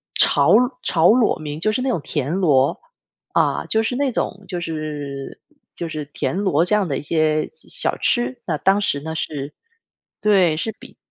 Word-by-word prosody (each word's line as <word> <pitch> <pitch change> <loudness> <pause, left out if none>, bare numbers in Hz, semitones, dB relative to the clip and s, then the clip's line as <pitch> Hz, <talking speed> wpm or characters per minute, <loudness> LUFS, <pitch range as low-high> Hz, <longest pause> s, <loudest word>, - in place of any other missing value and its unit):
炒 145 +7 +5 0.3
炒 165 0 +4
裸 235 -1 +3
名， 150 0 -5
就 215 +5 +1
是 255 - -1
那 265 - 0
种 230 - 0
田 145 0 -2
螺。 145 -8 +2 0.5
啊， - - +1
就 220 - +2
是 235 +3 -1
那 275 0 0
种 200 -3 -3
就 180 - -3
是 150 -4 -5 0.3
就 170 - -5
是 155 -2 -4
田 - - -2
螺 175 -5 +2
这 210 - +2
样 210 -2 +2
的 135 - -1
一 - - -4
些 155 0 +1
小 470 - -3
吃。 240 0 0
那 160 -4 -1
当 195 +6 +2
时 145 -7 0
呢 160 +2 -5
是 145 -3 -4 0.7
对， 190 -7 +3
是 220 +7 -2
比 - - -14
165 Hz, 195 characters per minute, -21 LUFS, 150-210 Hz, 0.7 s, 炒